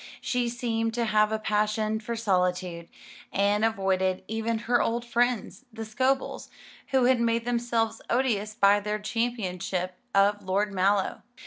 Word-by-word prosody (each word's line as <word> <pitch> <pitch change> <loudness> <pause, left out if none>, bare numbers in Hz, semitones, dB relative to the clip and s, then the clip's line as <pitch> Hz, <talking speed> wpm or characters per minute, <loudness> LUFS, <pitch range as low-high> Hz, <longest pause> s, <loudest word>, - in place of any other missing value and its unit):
She 245 -1 -1
seemed 225 -2 -2
to 240 -1 0
have 215 0 +3
a 220 - +1
passion 215 0 0
for 235 +2 -4
solitude, 180 -5 -1 0.4
and 205 +2 +2
avoided 190 -4 +1
even 225 +1 -1
her 240 +1 +3
old 235 +1 -1
friends, 245 +1 -1
the 225 0 -6
Scobels, 260 +5 -1 0.4
who 265 -2 +2
had 250 -1 +3
made 230 0 +1
themselves 235 -2 -1
odious 215 -4 0
by 205 -2 +5
their 210 +1 -2
championship 195 -5 -2 0.2
of 205 +1 +3
Lord 200 +2 0
Mallow. 195 +1 +1
220 Hz, 140 wpm, -27 LUFS, 200-235 Hz, 0.4 s, by